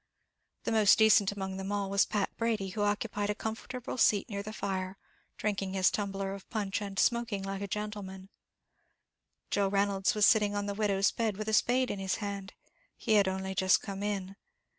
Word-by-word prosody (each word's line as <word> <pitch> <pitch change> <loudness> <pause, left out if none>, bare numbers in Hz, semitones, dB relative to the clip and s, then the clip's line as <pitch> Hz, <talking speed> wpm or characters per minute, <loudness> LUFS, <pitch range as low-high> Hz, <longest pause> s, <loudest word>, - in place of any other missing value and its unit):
The - - -2
most 215 -3 +5
decent 220 -2 +5
among 190 -1 -5
them 195 +1 -4
all 200 -1 -1
was 200 +1 +2
Pat 205 -2 -1
Brady, 220 -4 -1
who 205 +3 -4
occupied 205 0 -1
a 210 - 0
comfortable 245 +4 -5
seat 205 -3 +4
near 200 0 -3
the 210 +1 -7
fire, 190 -2 -3 0.4
drinking 195 -2 -2
his 185 -1 +4
tumbler 195 -1 -3
of 195 -1 -10
punch 205 -1 -2
and 200 -1 -6
smoking 235 -4 +1
like 195 0 -4
a 200 - -3
gentleman; 200 -2 -5 1.2
Joe 200 -1 +2
Reynolds 195 0 +1
was 210 -1 +5
sitting 210 -2 +4
on 205 0 -1
the 200 - -2
widow's 200 -2 +2
bed, 220 -4 -1
with 215 0 -5
a - - -2
spade 250 +4 +3
in 200 - -4
his 190 -1 -1
hand; 200 -2 -5 0.4
he 220 - 0
had 205 -2 +5
only 190 0 -2
just 190 0 +3
come 195 0 -5
in. 200 -2 -3
200 Hz, 190 wpm, -30 LUFS, 195-210 Hz, 1.2 s, most